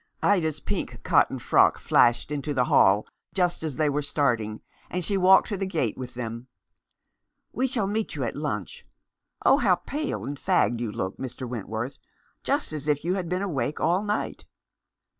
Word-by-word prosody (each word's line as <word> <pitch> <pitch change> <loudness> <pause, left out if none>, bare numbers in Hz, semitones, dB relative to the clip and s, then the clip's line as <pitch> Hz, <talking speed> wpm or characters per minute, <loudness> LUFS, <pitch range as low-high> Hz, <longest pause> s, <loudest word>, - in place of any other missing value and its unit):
Ida's 160 -6 +2
pink - - -4
cotton - - +3
frock - - +4
flashed 120 +5 +3
into 145 0 -3
the 125 -1 +3
hall 100 -1 +4 0.3
just 180 -2 +1
as 155 -4 -3
they 155 -1 +1
were 145 +1 0
starting, 120 -7 -1 0.3
and 180 -1 -2
she 200 - -1
walked 190 0 +6
to 205 - -2
the 195 0 -2
gate 155 - -1
with 125 -2 -8
them. 115 0 -5 1.1
"We 260 +2 +1
shall 240 -6 -1
meet 215 +2 -2
you - - -2
at - - -3
lunch. 480 0 -4 0.6
Oh! - - +6
how - - +4
pale 300 +1 -4
and 140 0 -5
fagged 120 - +2
you 120 -3 -2
look, 95 -2 -4
Mr. 130 0 -6
Wentworth, 115 +2 -5 0.4
just - - -1
as 150 -1 -5
if 145 -1 +1
you 180 - +1
had 185 -3 -3
been 180 +2 -1
awake 145 -7 -2
all 175 +4 +2
night." 210 0 -3
150 Hz, 180 wpm, -26 LUFS, 125-190 Hz, 1.1 s, walked